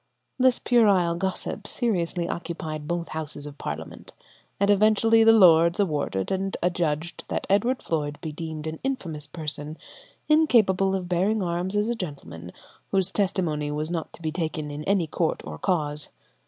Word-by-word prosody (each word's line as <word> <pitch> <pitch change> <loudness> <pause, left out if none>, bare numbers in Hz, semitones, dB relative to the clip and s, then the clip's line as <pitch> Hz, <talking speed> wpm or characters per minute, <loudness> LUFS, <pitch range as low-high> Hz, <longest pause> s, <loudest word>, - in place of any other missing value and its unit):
This 255 -1 +4
puerile 200 -8 +3
gossip 190 +3 -2
seriously 175 -7 0
occupied 155 -4 -5
both 170 0 -2
houses 155 -2 -4
of 145 -1 -10
Parliament, 80 +2 -6 0.5
and 200 +1 +4
eventually 220 +2 +4
the 225 - +7
Lords 170 -5 +6
awarded 145 - -1
and 195 0 -1
adjudged 170 -2 -1
that - - -3
Edward 235 +6 +2
Floyde 150 -2 -2
be 160 - -5
deemed 160 -1 -6
an 160 0 -5
infamous 170 - -3
person, 150 -1 -5 0.5
incapable 215 -12 +4
of 185 -2 -3
bearing 190 +4 +1
arms 175 +3 -2
as 210 +1 +1
a 235 - 0
gentleman, 140 - -7 0.4
whose 190 -1 +2
testimony 175 -8 0
was 150 +2 -3
not 165 -3 -3
to 165 - -14
be 155 - -1
taken 155 -3 -3
in 145 +1 -6
any 195 -3 +2
court 155 - -1
or 75 0 -7
cause. 150 -4 0
170 Hz, 155 wpm, -25 LUFS, 155-200 Hz, 0.5 s, the